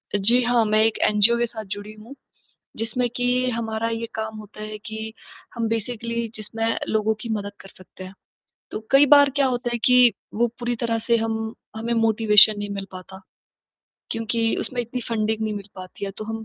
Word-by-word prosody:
जी 225 +5 +4
हाँ, 240 -1 +3
मैं 215 0 +2
एक 225 0 +1
एनजीओ 215 +3 +4
के 240 - +1
साथ 220 -2 -8
जुड़ी 205 +1 -8
हूँ 220 +6 -13 0.6
जिसमें 230 +2 -1
कि 250 +1 +1
हमारा 225 -1 -2
ये 230 0 -3
काम 220 0 -4
होता 215 0 -10
है 215 0 -5
कि 220 0 -6 0.4
हम 230 -2 -1
बेसिकली 230 +1 -3
जिसमें 215 +1 -5 0.2
लोगों 220 0 +1
की 235 - -6
मदद 205 -1 -3
कर 195 - -12
सकते 185 0 -13
हैं। 185 - -9 0.6
तो - - -4
कई 275 +1 +7
बार 285 0 +7
क्या 280 -1 +3
होता 245 -1 -2
है 240 - 0
कि 250 -3 +6 0.2
वो 240 +2 +2
पूरी 240 0 -1
तरह 230 -1 0
से 235 -1 +4
हम 220 0 -2 0.2
हमें 230 +2 -2
मोटिवेशन 220 -2 +5
नहीं 205 0 -4
मिल 195 -1 -4
पाता। 190 +1 -10 0.9
क्योंकि 225 0 0
उसमें 250 -2 -3
इतनी 240 +2 -5
फंडिंग 220 -1 -1
नहीं 215 -1 -1
मिल 200 -1 -7
पाती 185 +1 -8
या 195 - -4
तो 215 - -5
हम 225 0 -5
225 Hz, 195 wpm, -23 LUFS, 215-235 Hz, 0.9 s, कई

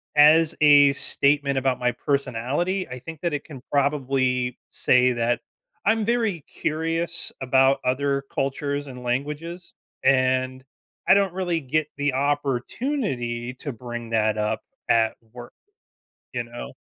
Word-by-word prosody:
as 155 +2 +6
a 145 -2 +7
statement 140 0 +1
about 130 -1 +1
my 125 0 +1
personality, 140 - -1
I 125 - -6
think 160 +4 -9
that 170 -3 -1
it 145 - -2
can 140 -6 -11
probably 130 -3 +1
say 125 0 +3
that 120 0 0 0.5
I'm 220 0 +2
very 225 -7 0
curious 165 +2 -2
about 135 +1 +3
other 140 +2 0
cultures 140 +1 -2
and 125 -1 -9
languages, 150 +8 -4 0.3
and 130 0 +2 0.5
I - - +9
don't 195 -2 +2
really 175 -3 -1
get 155 +3 0
the 145 -1 0
opportunity 135 - -1
to 145 - -4
bring 120 0 -7
that 110 -1 +1
up 105 0 0 0.3
at 115 -1 +3 0.2
work. 120 -1 -10 0.8
You 120 - -1
know? 120 +1 -8
140 Hz, 130 wpm, -24 LUFS, 125-155 Hz, 0.8 s, I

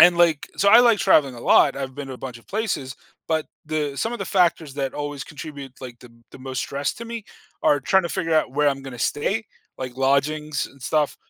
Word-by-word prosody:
and, 175 0 +8
like 165 -4 +3
So 200 - +3
I 225 - +9
like 235 -4 +5
traveling 140 -9 +4
a 120 - -10
lot. - - +5
I've 135 -1 -5
been 145 -1 -6
to 130 - -6
a - - -9
bunch 125 -2 -9
of 115 - -22
places, 190 - -3 0.3
but 160 -1 0 0.2
the 150 -2 -2
some 225 +10 -1
of 240 - -4
the - - -3
factors 165 -5 +2
that 135 -2 -3
always 145 -1 -4
contribute, 145 -3 -9
like, 125 -2 -9
the 125 - -14 0.2
the - - -12
most 130 0 -5
stress 140 +1 -2
to 235 - -8
me 230 -2 -6 0.4
are 145 - +4
tryna 180 +4 +2
figure 165 -2 -1
out 155 -4 +2
where 145 +1 +3
I'm 135 -1 -2
gonna 130 -3 -8
stay, 205 +10 -1 0.3
like, 130 -1 -6
lodgings 140 +2 +1
and 140 - -18
stuff, 150 +2 0
145 Hz, 230 wpm, -23 LUFS, 135-170 Hz, 0.4 s, I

